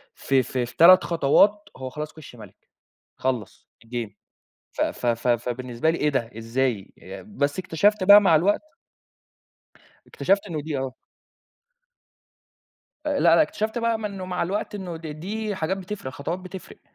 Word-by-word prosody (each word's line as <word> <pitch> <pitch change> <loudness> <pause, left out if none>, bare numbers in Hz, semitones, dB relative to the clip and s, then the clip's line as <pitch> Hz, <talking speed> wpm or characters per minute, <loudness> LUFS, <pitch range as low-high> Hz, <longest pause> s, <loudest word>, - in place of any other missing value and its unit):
ف - - -5
ف 130 -1 +2
في 120 -1 -2
3 180 +6 +8
خطوات، 175 +6 +3
هو 130 0 -6
خلاص 150 +3 -6
كِشّ 155 -5 -13
مَلِك، 105 -5 -15 0.5
خلّص 130 -4 -4
الجيم 115 -3 -5 0.6
ف - - -2
ف 125 - -2
ف 120 +1 0
فبالنسبة 120 +4 0
لي، 165 - -2
إيه 150 - +1
ده؟ 120 -5 -2
إزاي؟ 115 -3 -2 0.3
بس 145 -8 -2
اكتشفت 185 +3 +1
بقى 205 +2 +9
مع 180 -5 +4
الوقت 195 - +2 1.5
اكتشفت 200 +2 0
إنه 160 -5 -4
دي، 150 -1 -4
آه. 130 -1 -3 2.1
لأ، 290 -2 0
لأ، 170 0 +5
اكتشفت 215 +8 -2
بقى 230 -1 0
م 215 - -4
إنه 195 -3 -5
مع 180 -1 -2
الوقت، 205 +4 -3
إنه 180 -4 -6
د 160 0 -9
دي 205 +8 -4
حاجات 185 +2 -2
بتفرِق، 190 -7 -6
خطوات 165 +7 -4
بتفرِق. 185 0 -10
160 Hz, 150 wpm, -24 LUFS, 130-195 Hz, 2.1 s, بقى